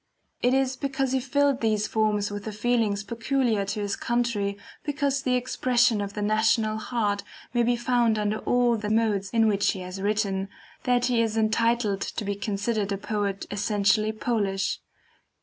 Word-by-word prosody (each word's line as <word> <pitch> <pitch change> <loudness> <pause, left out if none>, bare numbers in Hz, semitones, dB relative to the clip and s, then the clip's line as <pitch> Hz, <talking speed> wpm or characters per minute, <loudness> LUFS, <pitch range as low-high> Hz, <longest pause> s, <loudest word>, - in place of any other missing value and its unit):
It 250 +2 +3
is 265 -1 +1
because 270 -1 -1
he 265 - +2
filled 280 +1 +1
these 215 -2 +1
forms 210 -2 0
with 205 0 -6
the 220 - -3
feelings 215 -2 0
peculiar 230 -1 0
to 210 +2 -3
his 200 -1 -1
country, 230 -4 -1 0.3
because 285 -2 0
the 255 -1 +1
expression 245 -2 +2
of 200 0 -4
the 210 - -2
national 215 +1 +2
heart 210 -3 -1 0.3
may 240 - +2
be 240 +1 +2
found 240 -2 +2
under 210 +1 0
all 245 -1 +2
the 210 -1 -4
modes 210 -3 +1
in 225 -1 +3
which 200 -1 +2
he 190 - -6
has 185 +1 -6
written, 200 -2 0 0.4
that 245 -1 +3
he 245 -2 +2
is 225 -1 -1
entitled 220 -2 +1
to 215 - -4
be 200 - -1
considered 205 +1 -2
a 200 - 0
poet 200 -1 -2
essentially 210 +1 +2
Polish. 210 -3 -1
220 Hz, 170 wpm, -26 LUFS, 205-245 Hz, 0.4 s, It